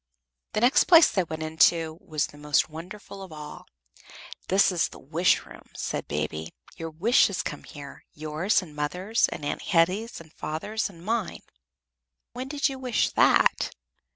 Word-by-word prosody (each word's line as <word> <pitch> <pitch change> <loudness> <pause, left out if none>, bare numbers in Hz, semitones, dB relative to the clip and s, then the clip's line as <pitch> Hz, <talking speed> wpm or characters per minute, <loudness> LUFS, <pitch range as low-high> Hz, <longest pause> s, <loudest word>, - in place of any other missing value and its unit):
The 215 - 0
next 245 +2 +5
place 335 -3 +7
they 190 - +1
went 160 -1 -5
into 160 +1 +2
was 155 -6 -1
the 145 - -13
most 150 -1 +2
wonderful 185 +5 -9
of 190 -3 -10
all. 150 -1 -9 0.8
"This 195 +1 +4
is 175 -3 +1
the - - -13
Wish 165 +6 +1
room," - - -14
said - - -4
Baby. 75 +2 -4 0.2
"Your 165 0 -6
wishes 195 +4 +2
come - - -5
here 145 -1 -11
yours 155 +7 0
and 155 -4 -13
mother's, 180 +9 0
and 145 - -6
Aunt - - -3
Hetty's 195 +5 +1
and 160 -2 -15
father's 210 +9 -3
and 170 -2 -14
mine. 225 -3 -2 0.9
When 255 +1 -5
did 285 +1 0
you 270 -2 -5
wish 250 -3 0
that?" - - +3
170 Hz, 160 wpm, -26 LUFS, 155-210 Hz, 0.9 s, place